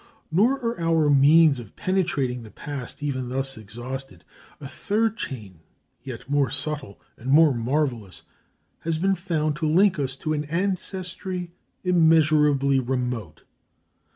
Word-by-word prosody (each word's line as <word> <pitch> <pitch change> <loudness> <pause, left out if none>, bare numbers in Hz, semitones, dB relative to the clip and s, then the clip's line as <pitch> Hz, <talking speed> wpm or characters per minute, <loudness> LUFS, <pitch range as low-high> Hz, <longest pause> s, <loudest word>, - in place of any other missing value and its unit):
Nor 210 +11 +4
are 230 -4 -1
our 165 -3 +3
means 145 +1 +6
of 115 -5 -11
penetrating 165 -10 -1
the 110 - -11
past 140 +2 -7
even 130 -4 -2
thus 135 +1 -2
exhausted. 115 -2 -8 0.3
A 140 - -7
third 215 +9 -1
chain 105 - -7 0.4
yet 125 -4 -8
more 140 -2 +2
subtle 145 -8 -2 0.2
and 125 - -7
more 150 +1 +6
marvellous 120 -5 -2 0.6
has 165 -1 -2
been 190 +4 +2
found 165 -5 -1
to 155 0 -1
link 185 +1 +4
us 135 -1 -2
to 155 +3 -3
an 150 0 -2
ancestry 180 +1 -3 0.3
immeasurably 155 -5 +4
remote. 125 -7 -3
145 Hz, 130 wpm, -24 LUFS, 130-165 Hz, 0.6 s, means